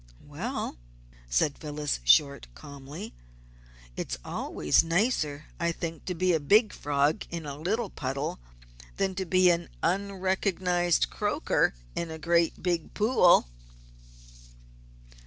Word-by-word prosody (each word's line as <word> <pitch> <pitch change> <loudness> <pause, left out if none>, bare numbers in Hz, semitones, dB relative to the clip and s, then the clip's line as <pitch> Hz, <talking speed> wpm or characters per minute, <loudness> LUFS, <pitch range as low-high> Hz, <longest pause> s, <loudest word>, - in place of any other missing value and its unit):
"Well," - - -5 0.5
said 140 - +1
Phyllis 150 - -3
Short, 140 - +4
calmly. 140 - -9 0.8
"It's - - -4
always 75 - +1
nicer, 165 - 0
I 170 0 +1
think, 165 -2 -6
to 180 - -3
be 180 +1 +2
a 160 - +2
big 210 +9 +4
frog 145 +1 0
in 170 -2 -5
a 140 -1 -5
little 195 +8 -2
puddle 135 - -3 0.6
than 195 -1 0
to 190 0 -3
be 185 0 +5
an 170 0 -2
unrecognised 185 - +1
croaker - - 0 0.2
in 170 - -3
a 160 - -6
great, 170 +1 +1
big 175 -3 -1
pool." 210 - +5
170 Hz, 120 wpm, -28 LUFS, 145-185 Hz, 0.8 s, be